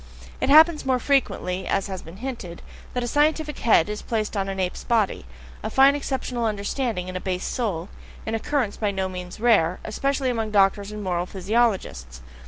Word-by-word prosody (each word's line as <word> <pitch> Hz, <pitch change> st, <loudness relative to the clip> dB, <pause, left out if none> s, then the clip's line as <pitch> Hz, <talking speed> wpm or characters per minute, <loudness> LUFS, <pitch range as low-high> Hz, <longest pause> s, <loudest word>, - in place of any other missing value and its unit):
It -, -, +1 dB
happens 315 Hz, +2 st, +7 dB
more 260 Hz, -1 st, +2 dB
frequently, 190 Hz, -9 st, 0 dB
as 195 Hz, -, 0 dB
has 190 Hz, -2 st, -5 dB
been 165 Hz, +3 st, -12 dB
hinted, 195 Hz, -10 st, -6 dB, 0.3 s
that 250 Hz, -, 0 dB
a -, -, -2 dB
scientific 300 Hz, +2 st, +1 dB
head 215 Hz, -8 st, +4 dB
is 210 Hz, 0 st, -4 dB
placed 215 Hz, -2 st, -2 dB
on 195 Hz, -1 st, -1 dB
an 195 Hz, 0 st, -4 dB
ape's 185 Hz, -1 st, -2 dB
body, 220 Hz, -, 0 dB, 0.3 s
a -, -, -3 dB
fine 270 Hz, +1 st, +6 dB
exceptional 260 Hz, -4 st, -2 dB
understanding 210 Hz, -1 st, -2 dB
in 185 Hz, -, -6 dB
a 185 Hz, -, -3 dB
base 185 Hz, -1 st, -3 dB
soul, 195 Hz, -9 st, -2 dB, 0.4 s
an 220 Hz, -, -3 dB
occurrence 225 Hz, -1 st, -1 dB
by 210 Hz, -, 0 dB
no 190 Hz, -1 st, -1 dB
means 180 Hz, +1 st, -7 dB
rare, 205 Hz, -7 st, +3 dB
especially 270 Hz, +3 st, -1 dB
among 225 Hz, -2 st, -2 dB
doctors 200 Hz, 0 st, +2 dB
and 210 Hz, 0 st, -6 dB
moral 175 Hz, -1 st, -1 dB
physiologists. 190 Hz, -, -1 dB
210 Hz, 185 wpm, -24 LUFS, 185-250 Hz, 0.4 s, happens